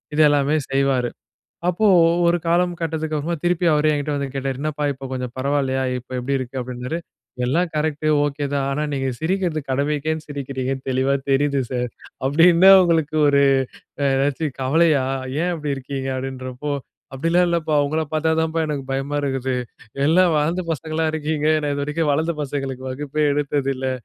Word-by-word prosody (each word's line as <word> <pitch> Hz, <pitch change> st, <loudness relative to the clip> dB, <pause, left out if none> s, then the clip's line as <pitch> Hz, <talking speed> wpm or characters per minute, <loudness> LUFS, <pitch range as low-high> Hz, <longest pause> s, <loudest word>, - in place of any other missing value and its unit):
இது 155 Hz, -, +4 dB
எல்லாமே 145 Hz, +1 st, +2 dB, 0.2 s
செய்வாரு. 135 Hz, -3 st, +1 dB, 0.6 s
அப்போ 195 Hz, +5 st, +2 dB, 0.4 s
ஒரு 170 Hz, +1 st, +3 dB
காலம் 175 Hz, +1 st, +2 dB
கட்டத்துக்கு 160 Hz, -1 st, -2 dB
அப்புறமா 165 Hz, +3 st, -2 dB
திருப்பி 175 Hz, 0 st, +1 dB
அவரே 150 Hz, +1 st, +3 dB
என்கிட்ட 145 Hz, 0 st, -2 dB
வந்து 140 Hz, -1 st, -2 dB
கேட்டாரு, 135 Hz, -1 st, -3 dB
"என்னப்பா 150 Hz, 0 st, -2 dB
இப்போ 135 Hz, 0 st, -8 dB
கொஞ்சம் 125 Hz, -1 st, -4 dB
பரவாயில்லையா? 135 Hz, -1 st, 0 dB
இப்போ 125 Hz, +1 st, -13 dB
எப்படி 135 Hz, +2 st, -1 dB
இருக்கு?" 130 Hz, 0 st, -5 dB
அப்படின்னாரு. 125 Hz, +5 st, -4 dB, 0.5 s
"எல்லாம் 165 Hz, +7 st, +1 dB
கரெக்ட்டு, 155 Hz, 0 st, -1 dB, 0.2 s
ஒகே 145 Hz, 0 st, -2 dB
தான். 135 Hz, -1 st, 0 dB
ஆனா 150 Hz, +2 st, -1 dB
நீங்க 135 Hz, -1 st, -1 dB
சிரிக்கிறது 170 Hz, -2 st, -1 dB
கடமைக்கேனு 150 Hz, +3 st, -1 dB
சிரிக்கிறீங்கனு 135 Hz, -2 st, -4 dB
தெளிவா 130 Hz, +1 st, +1 dB, 0.2 s
தெரிது 140 Hz, 0 st, +2 dB
சர். 125 Hz, -1 st, -2 dB, 0.3 s
அப்படி 145 Hz, +5 st, +4 dB
என்ன 190 Hz, +3 st, +8 dB
உங்களுக்கு 160 Hz, -3 st, +1 dB
ஒரு 140 Hz, 0 st, +4 dB, 0.6 s
அ -, -, +1 dB
எதாச்சும் 140 Hz, +1 st, -1 dB
கவலையா, 145 Hz, 0 st, +3 dB, 0.4 s
ஏன் 180 Hz, -, 0 dB
அப்படி 150 Hz, -3 st, -3 dB
இருக்கீங்க?" 135 Hz, 0 st, -4 dB
அப்படின்றப்போ. 130 Hz, +1 st, -5 dB, 0.4 s
"அப்படிலாம் 165 Hz, +5 st, +2 dB
இல்லப்பா 160 Hz, -2 st, 0 dB
உங்கள 155 Hz, +2 st, -1 dB
பார்த்தா 160 Hz, +1 st, +1 dB
தான்ப்பா 160 Hz, 0 st, 0 dB
எனக்கு 145 Hz, -2 st, -2 dB
பயமா 135 Hz, +2 st, -2 dB
இருக்குது. 135 Hz, -2 st, -1 dB, 0.5 s
எல்லாம் 175 Hz, +1 st, +4 dB
வளர்ந்த 165 Hz, +5 st, 0 dB
பசங்களா 160 Hz, +1 st, -2 dB
இருக்கீங்க, 155 Hz, -1 st, -1 dB
நான் 145 Hz, -1 st, -1 dB
இதுவரைக்கும் 150 Hz, +2 st, 0 dB
வளர்ந்த 160 Hz, +3 st, 0 dB
பசங்களுக்கு 135 Hz, -2 st, -4 dB
வகுப்பே 145 Hz, +3 st, -2 dB
எடுத்ததில்லை". 135 Hz, -2 st, -1 dB
145 Hz, 155 wpm, -21 LUFS, 135-160 Hz, 0.6 s, என்ன